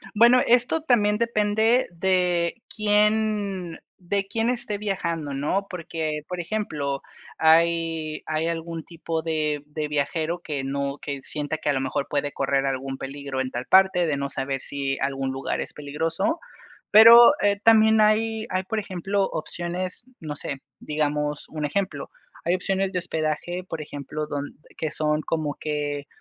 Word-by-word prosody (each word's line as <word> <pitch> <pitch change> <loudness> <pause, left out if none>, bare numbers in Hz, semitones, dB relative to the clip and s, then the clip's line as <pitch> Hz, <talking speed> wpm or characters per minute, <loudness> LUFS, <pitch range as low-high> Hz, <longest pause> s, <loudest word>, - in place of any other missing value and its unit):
Bueno, 240 +3 +6
esto 245 +6 +3
también 210 -7 +3
depende 220 +1 +2
de 180 +2 +1
quién 210 -4 +1 0.2
de 195 +2 -2
quién 225 +3 0
esté 235 -4 -2
viajando, 170 -8 -2
¿no?, 150 +9 -1
porque, 160 -3 -4
por 180 -1 -5
ejemplo, 150 -9 -3 0.4
hay 165 -1 +2
hay 155 +1 0
algún 165 -1 -4
tipo 165 -1 -4
de 155 -3 -1
de 150 0 -4
viajero 155 +3 -1
que 145 -3 -4
no 140 +1 -2
que 140 -2 -5
sienta 150 +1 -2
que 150 - -2
a - - +3
lo 135 - 0
mejor 140 +1 -2
puede 145 0 -1
correr 135 0 0
algún 135 0 -3
peligro 135 -1 -4
en 130 - -2
tal 120 0 -4
parte, 190 -2 +5
de 150 -3 0
no 140 0 -2
saber 135 0 -3
si 140 -1 -3
algún 135 -1 -1
lugar 135 +1 -2
es - - -6
peligroso. 160 - -2 0.5
Pero, 230 +3 +10 0.2
eh, 200 0 +3
también 220 -1 +6
hay 220 +1 +2
hay, 185 0 -1
por 220 +4 -3
ejemplo, 195 0 -1
opciones, 175 +5 -4 0.2
no 150 -2 -5
sé, 140 -2 -5 0.2
digamos, 150 -1 -2
un 155 -1 -4
ejemplo, 195 +5 -2 0.4
hay 175 - +2
opciones 190 +1 -1
de 180 - 0
hospedaje, 170 +1 -2
por 160 -2 -4
ejemplo, 150 +1 -5
donde 145 -1 -5 0.2
que 155 - -2
son 150 +1 0
como 155 -3 -2
que 145 -2 -3
165 Hz, 155 wpm, -24 LUFS, 145-200 Hz, 0.5 s, Pero